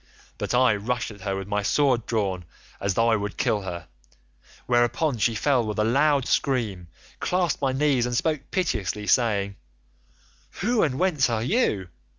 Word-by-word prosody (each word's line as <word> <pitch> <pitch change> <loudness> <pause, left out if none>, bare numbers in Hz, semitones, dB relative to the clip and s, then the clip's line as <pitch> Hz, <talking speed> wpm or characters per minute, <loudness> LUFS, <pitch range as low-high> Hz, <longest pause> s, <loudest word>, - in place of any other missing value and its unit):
"But - - -1
I 125 -3 +4
rushed 120 +4 -2
at 100 -2 -13
her 95 0 -2
with 95 0 -5
my 105 0 0
sword 125 +1 +1
drawn 100 -5 -1 0.4
as 100 -1 -1
though 115 0 +3
I 115 - +4
would 105 -1 -4
kill 105 - +1
her, 85 -3 -6 0.8
whereon 120 +3 +1
she 115 +1 +2
fell 130 +2 +2
with 110 -1 -4
a 105 - +2
loud 140 +4 +2
scream, 110 -10 0 0.3
clasped 180 -5 0
my 135 -2 +1
knees, 135 -3 +1
and 120 - -2
spoke 150 +1 -1
piteously, 110 - -2
saying, 100 -4 +1 1.0
'Who 230 +3 +2
and 130 -5 +1
whence 155 -8 +2
are 115 -1 -1
you? 115 - 0
120 Hz, 165 wpm, -25 LUFS, 105-140 Hz, 1.0 s, I